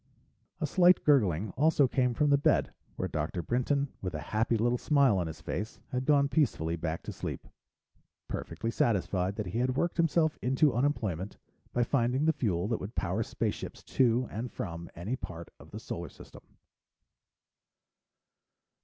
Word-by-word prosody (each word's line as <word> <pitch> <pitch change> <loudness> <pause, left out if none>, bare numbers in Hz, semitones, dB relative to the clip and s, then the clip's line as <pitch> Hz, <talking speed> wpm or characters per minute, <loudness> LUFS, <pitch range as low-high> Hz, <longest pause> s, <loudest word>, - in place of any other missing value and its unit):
A - - 0
slight 180 -1 +5
gurgling 105 - +3
also 150 - +3
came 125 -1 +1
from 150 +2 +2
the 140 - +6
bed, - - +2 0.2
where 95 - -2
Dr. 80 +1 -3
Brinton, 140 - 0
with 90 -4 -4
a - - -3
happy 115 +2 +2
little 120 +2 +1
smile 140 -9 +3
on 85 - -1
his 80 -1 -8
face, 105 +6 -4
had 130 0 -2
gone 140 -2 +5
peacefully 130 - +1
back 80 0 -3
to - - -5
sleep, - - -6 0.8
perfectly 115 - -4
satisfied 95 -4 0
that 110 - -3
he 95 +6 -3
had 130 +1 0
worked 170 +3 0
himself 165 -1 +2
into 135 +3 +3
unemployment 110 - -1 0.3
by 120 - +2
finding 125 +3 +1
the 160 - +4
fuel 100 - -1
that 115 - 0
would 100 +4 -7
power - - -1
spaceships - - -3
to 125 -1 +2
and 115 +2 -4
from 85 -2 -6
any 100 +9 -3
part 85 -8 -8
of - - -14
the - - -7
Solar - - -6
System. - - -14
120 Hz, 160 wpm, -30 LUFS, 95-140 Hz, 0.8 s, the